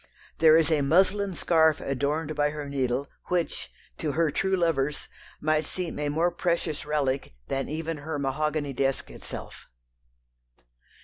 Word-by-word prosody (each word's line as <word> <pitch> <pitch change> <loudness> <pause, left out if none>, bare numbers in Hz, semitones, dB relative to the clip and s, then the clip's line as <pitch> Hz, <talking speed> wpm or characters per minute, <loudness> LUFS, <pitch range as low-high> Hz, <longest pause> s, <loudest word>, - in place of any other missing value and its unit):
There 160 0 +7
is 165 0 +3
a 155 -2 +3
muslin 190 +6 +3
scarf 160 -3 +3
adorned 145 +3 -1
by 145 0 +2
her 150 -1 -5
needle 135 -1 -1 0.2
which, 175 -2 -1 0.3
to 150 -3 -1
her 160 0 +2
true 190 +4 +1
lovers, 150 -5 0 0.3
might 155 0 +2
seem 175 0 -4
a 145 0 0
more 165 +4 +2
precious 170 -4 -1
relic 140 - 0 0.2
than 135 0 -1
even 160 +1 -3
her 150 +1 -4
mahogany 145 +1 -1
desk 135 +1 -1
itself. - - -8
155 Hz, 140 wpm, -27 LUFS, 140-165 Hz, 0.3 s, There